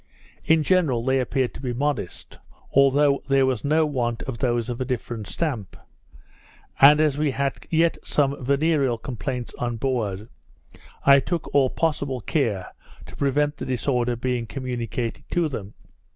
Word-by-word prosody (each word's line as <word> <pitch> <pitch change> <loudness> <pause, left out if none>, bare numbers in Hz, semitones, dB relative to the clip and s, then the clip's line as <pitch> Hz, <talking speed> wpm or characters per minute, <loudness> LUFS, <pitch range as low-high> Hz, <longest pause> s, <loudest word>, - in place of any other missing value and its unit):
In 160 -1 +4
general 150 -9 +2
they 135 0 +2
appeared 130 -1 -1
to - - -10
be 125 -3 -2
modest; 135 -8 -3 0.3
although 140 +1 +4
there 135 -1 +4
was 130 -5 -1
no 155 +2 +3
want 120 -5 -2
of 125 -3 -6
those 120 -2 0
of 120 0 -4
a - - +2
different 120 -4 -4
stamp; 125 - -3 1.0
and 145 +2 +8
as 150 -2 +2
we 150 -1 +2
had 140 0 -3
yet 165 0 +2
some 140 -2 0
venereal 140 -2 +2
complaints 125 +1 -5
on 120 -1 -2
board, 110 -5 -2 0.8
I 140 0 +8
took 170 +4 -4
all 135 -2 +4
possible 145 -5 -1
care 110 - -1 0.3
to - - -12
prevent 145 +1 0
the - - -5
disorder 125 -1 0
being 120 -1 -2
communicated 120 -3 -4
to 175 -2 +1
them. 105 -8 -7
130 Hz, 150 wpm, -24 LUFS, 120-145 Hz, 1.0 s, and